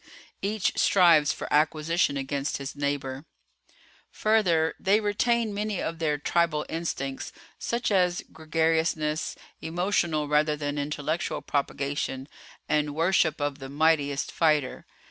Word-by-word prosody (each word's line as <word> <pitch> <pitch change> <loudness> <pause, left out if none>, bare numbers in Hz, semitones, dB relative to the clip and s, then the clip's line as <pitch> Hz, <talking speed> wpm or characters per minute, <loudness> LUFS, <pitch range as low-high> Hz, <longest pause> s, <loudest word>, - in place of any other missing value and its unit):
Each 205 -1 0
strives 170 -6 +5
for - - -5
acquisition 155 0 +2
against 140 +1 -2
his 140 0 -6
neighbor. 140 -1 -3 0.8
"Further 180 -8 +2
they 200 +2 +3
retain 220 +1 +1
many 210 -1 -2
of 165 0 -3
their 150 -3 0
tribal 155 0 +1
instincts, 140 -5 -4 0.3
such 235 -1 -1
as 180 -3 +2
gregariousness, 160 -1 0 0.3
emotional 170 -3 0
rather 150 +1 +2
than 145 -1 -3
intellectual 150 +3 -2
propagation, 140 -1 -2 0.4
and 150 -1 0
worship 165 -1 +2
of 145 -1 -2
the 135 0 -8
mightiest 145 -1 +1
fighter. 150 -5 +1
155 Hz, 115 wpm, -27 LUFS, 145-175 Hz, 0.8 s, strives